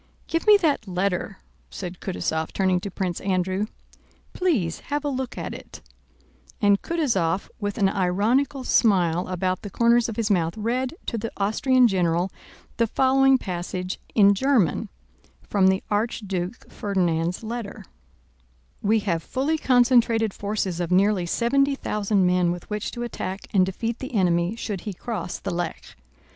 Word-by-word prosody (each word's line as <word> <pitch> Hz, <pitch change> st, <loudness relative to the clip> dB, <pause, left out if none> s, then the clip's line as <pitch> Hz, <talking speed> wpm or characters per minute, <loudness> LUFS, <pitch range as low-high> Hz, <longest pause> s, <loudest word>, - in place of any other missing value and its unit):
"Give 330 Hz, +5 st, -2 dB
me 420 Hz, -1 st, +9 dB
that 300 Hz, -, 0 dB
letter," 185 Hz, +1 st, -1 dB, 0.3 s
said 180 Hz, -2 st, -7 dB
Kutúzov 160 Hz, -4 st, -2 dB
turning 185 Hz, -2 st, +2 dB
to 200 Hz, -, -5 dB
Prince 185 Hz, -2 st, -3 dB
Andrew. 190 Hz, +1 st, 0 dB, 0.7 s
"Please 250 Hz, -, 0 dB
have 290 Hz, 0 st, -1 dB
a -, -, +1 dB
look 260 Hz, -2 st, -4 dB
at -, -, -4 dB
it"—and 65 Hz, -, -4 dB
Kutúzov 200 Hz, -, 0 dB
with 205 Hz, -2 st, -3 dB
an 200 Hz, -3 st, +3 dB
ironical 210 Hz, +9 st, +1 dB
smile 180 Hz, -8 st, +2 dB
about 185 Hz, 0 st, -1 dB
the 205 Hz, -, -7 dB
corners 235 Hz, +3 st, +3 dB
of 225 Hz, -, -5 dB
his 220 Hz, -2 st, 0 dB
mouth 170 Hz, -1 st, +1 dB
read 250 Hz, +6 st, -1 dB
to 230 Hz, -, -2 dB
the 225 Hz, +2 st, -4 dB
Austrian 245 Hz, +5 st, +3 dB
general 180 Hz, -2 st, +1 dB, 0.5 s
the 230 Hz, -, +2 dB
following 265 Hz, +2 st, +4 dB
passage, 180 Hz, -2 st, -4 dB, 0.2 s
in 200 Hz, -2 st, +6 dB
German, 220 Hz, -, +1 dB, 0.6 s
from 195 Hz, -2 st, +3 dB
the 190 Hz, 0 st, +2 dB
Archduke 205 Hz, -2 st, -2 dB
Ferdinand's 175 Hz, -2 st, -1 dB
letter: 220 Hz, -3 st, -6 dB, 1.0 s
We 215 Hz, +1 st, +2 dB
have 170 Hz, -5 st, -1 dB
fully 290 Hz, -, -1 dB
concentrated 240 Hz, -4 st, +3 dB
forces 200 Hz, -4 st, -2 dB
of 175 Hz, -2 st, -2 dB
nearly 190 Hz, -1 st, +3 dB
seventy 275 Hz, +8 st, +2 dB
thousand 205 Hz, -6 st, 0 dB
men 180 Hz, -1 st, +3 dB
with 175 Hz, 0 st, -6 dB
which 210 Hz, +1 st, -2 dB
to 240 Hz, -, -4 dB
attack 195 Hz, -4 st, -4 dB
and 190 Hz, -3 st, +5 dB
defeat 225 Hz, +5 st, -3 dB
the 260 Hz, -2 st, -6 dB
enemy 175 Hz, 0 st, +2 dB
should 205 Hz, -5 st, -4 dB
he 205 Hz, -, -5 dB
cross 185 Hz, -3 st, -5 dB
the -, -, -5 dB
Lech. 175 Hz, -1 st, -5 dB
200 Hz, 150 wpm, -24 LUFS, 180-235 Hz, 1.0 s, me